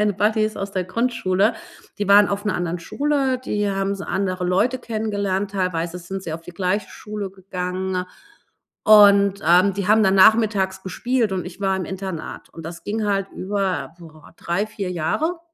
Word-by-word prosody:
meine 210 -1 +2
Buddies 215 +2 +1
aus 195 0 -4
der 185 -2 -2
Grundschule, 215 0 +1 0.4
die 205 - -1
waren 205 0 +7
auf 200 +1 -3
'ner 210 -3 0
anderen 175 0 -2
Schule, 270 - 0
die 210 -5 -1
haben 195 0 -1
s 195 - -5
andere 185 -2 -2
Leute 195 +8 +1
kennengelernt, 205 -4 -2
teilweise 180 -3 -2
sind 190 +2 -6
sie 165 - -5
auf 165 - -8
die 175 - -11
gleiche 190 +3 -1
Schule 210 -2 -6
gegangen. 185 -1 -4 0.8
Und, 200 -2 +6
ähm, 180 +4 +5
die 200 -1 -3
haben 215 +1 +5
dann 190 -1 +3
nachmittags 195 -2 +4
gespielt, 235 +3 -1
und 185 -1 -2
ich 180 +2 -10
war 195 -1 +1
im 190 - -3
Internat, 190 -2 -6
und 165 - -11
das 165 +1 -8
ging 215 +1 -2
halt 195 -1 0
über, 185 -7 -2
boah, 160 -3 -15
3, 175 +4 -1
4 200 -3 -5
Jahre. 315 - -1
195 Hz, 180 wpm, -22 LUFS, 185-210 Hz, 0.8 s, waren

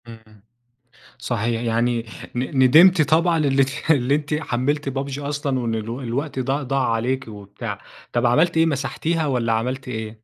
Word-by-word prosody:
إمم 115 -1 -10
إمم. 110 -2 -20 0.8
صحيح 115 0 -2
يعني 115 0 0 0.3
ن 130 +2 +1
ندمتِ 165 +7 +7
طبعًا 165 +3 +3
إنِّك 140 +1 +1
اللي 140 -2 +3
أنتِ 150 0 -3
حملتِ 145 0 -1
PUBG 135 +1 -4
أصلًا 145 -2 -2
وإن 115 -2 -2
الو 115 +4 -5
الوقت 135 +4 -3
ض 130 +1 -1
ضاع 135 -3 0
عليكِ 130 +3 -1
وبتاع. 105 0 -7 0.4
طَب 120 0 +1
عملتِ 160 +8 +3
إيه 165 - +5
مسحتيها 155 +3 -1
والّا 120 -4 0
عملتِ 125 +4 -2
إيه؟ 110 -2 -6
130 Hz, 160 wpm, -22 LUFS, 115-145 Hz, 0.8 s, ندمتِ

